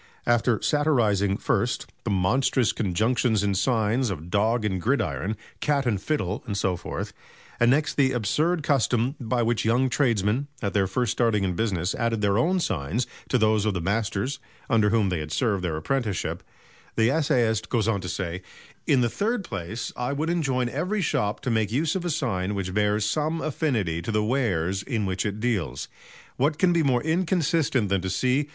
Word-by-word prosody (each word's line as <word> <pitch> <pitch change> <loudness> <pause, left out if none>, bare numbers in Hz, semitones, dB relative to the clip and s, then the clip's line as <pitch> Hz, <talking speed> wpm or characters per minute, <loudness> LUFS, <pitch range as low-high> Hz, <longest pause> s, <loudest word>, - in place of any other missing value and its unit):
After 120 -1 +2
satirizing 110 -10 +2
first, - - 0 0.2
the - - -1
monstrous 120 +6 +2
conjunctions 110 +2 +1
in 100 -1 +1
signs 115 +3 +1
of 85 -2 -6
"Dog 110 +3 +2
and 95 -3 -1
Gridiron," 110 -3 -1 0.2
"Cat 145 -2 +1
and 105 -6 0
Fiddle" 105 - -2
and 100 -2 -2
so 95 -2 +1
forth; 85 - -5 0.5
and 120 - +4
next 150 +4 +1
the 135 -2 +4
absurd 150 - 0
custom 130 -3 +1
by 120 -1 0
which 120 0 0
young 125 +3 +2
tradesmen, 120 0 +1
at 100 -2 -2
their 100 -2 +2
first 115 +4 0
starting 115 -4 +1
in 95 -2 0
business, 95 -2 -1
added 115 -2 -1
their 100 +1 +2
own 180 +9 +2
signs 95 - -1 0.2
to 125 - +3
those 110 -2 +3
of 105 -2 0
the - - -1
masters 115 +8 -1 0.3
under 110 -3 +4
whom 105 -2 +2
they 90 -3 -1
had 75 0 -6
served 100 -2 0
their 80 -3 -1
apprenticeship; 110 +3 -2 0.5
the 115 +2 +3
essayist 125 -8 +1
goes 115 -4 +1
on 100 -4 +1
to 90 - -5
say: 90 -1 -3 0.5
"In 135 -3 +4
the 120 - +3
third 210 - -1
place 105 - -5
I 125 +3 -2
would 155 +4 -1
enjoin 135 -7 0
every 180 - -1
shop 105 -7 0
to 130 - -1
make 110 -2 +1
use 150 +7 0
of 180 -2 -2
a - - 0
sign 105 - -1
which 95 -2 -3
bears 105 +1 +1
some 155 +7 0
affinity 120 - -1
to 115 - -4
the 105 0 +1
wares 100 -7 0
in 110 -2 -2
which 95 +1 -1
it 105 +1 -4
deals. 105 - -1 0.5
What 145 +4 +1
can 180 0 +3
be 170 - +3
more 130 -5 +2
inconsistent 160 - +1
than 100 -1 +1
to 95 - -3
see 130 +9 +1
115 Hz, 185 wpm, -25 LUFS, 100-135 Hz, 0.5 s, and